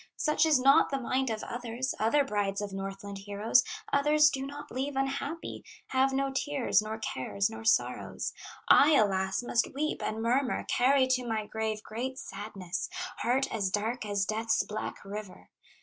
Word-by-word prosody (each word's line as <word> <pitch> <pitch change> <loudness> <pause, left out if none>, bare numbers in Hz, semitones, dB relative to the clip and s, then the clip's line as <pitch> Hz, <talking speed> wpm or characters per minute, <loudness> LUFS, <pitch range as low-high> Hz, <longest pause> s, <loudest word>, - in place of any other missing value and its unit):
"Such 305 +1 +2
is 300 -4 +4
not 275 +2 +5
the 275 - -1
mind 260 +1 0
of 220 -1 -3
others, 240 +2 -3
Other 230 +7 +3
brides 205 -6 -1
of 205 -1 -4
Northland 195 +1 -6
heroes; 205 +5 +2 0.3
Others 300 +2 +5
do 270 0 -3
not 290 +1 -9
leave 270 +2 -3
unhappy, 275 +4 -3 0.3
Have 265 +1 +3
no 270 0 0
tears, 275 -4 +1
nor 215 +1 -5
cares, 200 +2 -2
nor 225 0 -8
sorrows, 220 - 0 0.3
I 300 +2 +7
alas! 190 -2 +2
must 240 +2 0
weep 305 +2 -1
and 220 - -2
murmur, 250 +3 0
Carry 260 +2 +4
to 255 -1 +2
my 220 -2 -1
grave 220 0 -3
great 255 +4 -4
sadness, 195 -5 -5 0.3
Heart 260 +3 0
as 205 -4 0
dark 220 +5 -1
as 205 -2 0
Death's 225 +2 +1
black 210 -1 -6
river. 200 -1 -8
230 Hz, 165 wpm, -30 LUFS, 210-270 Hz, 0.3 s, I